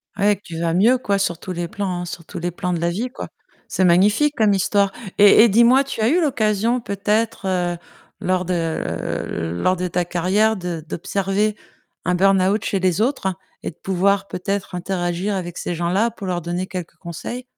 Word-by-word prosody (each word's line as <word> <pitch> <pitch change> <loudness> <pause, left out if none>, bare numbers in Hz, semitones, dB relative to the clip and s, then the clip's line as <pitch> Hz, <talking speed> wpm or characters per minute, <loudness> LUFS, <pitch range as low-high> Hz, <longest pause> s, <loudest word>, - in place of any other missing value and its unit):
Ouais 205 +1 +3
et - - -3
que - - -21
tu 165 -1 -7
vas 165 -1 0
mieux, 225 +8 +4
quoi, 200 -5 0
sur 170 -4 0
tous 185 - -7
les 175 -1 -3
plans, 185 -2 -3
hein, - - -4
sur 170 -1 -8
tous - - -7
les 175 +1 -2
plans 180 +1 -3
de 170 - -1
la 170 0 +1
vie, 225 +9 -2
quoi. 265 - -7 0.4
C'est 190 - 0
magnifique 205 +12 +4
comme 215 -2 +4
histoire 195 +1 +2 0.2
et 205 +2 +8
et 235 - +5
dis-moi, 235 +6 +5
tu 275 -4 -6
as 220 - +3
eu 345 +4 +3
l'occasion 230 -4 +1
peut-être, 210 +1 -1
heu, 175 -2 0 0.4
lors 185 0 0
de, 180 - -1
heu, 160 - -3
lors 185 - +3
de 180 0 -2
ta 175 0 -1
carrière 190 +6 +2
de 175 -4 -5
d'observer 200 +4 -1 0.5
un 180 - +2
burn-out 195 +2 +3
chez 195 - 0
les 185 +1 +1
autres 225 -7 0 0.3
et - - -3
de - - -23
pouvoir, 195 +1 +1
peut-être, 195 +1 -3
interagir 180 +2 -2
avec 175 -2 -5
ces 175 - -3
gens-là 180 +7 +1
pour 210 -3 -9
leur 175 -1 -1
donner 175 +2 -3
quelques 180 -2 -6
conseils? 185 +9 -6
190 Hz, 205 wpm, -21 LUFS, 175-210 Hz, 0.5 s, et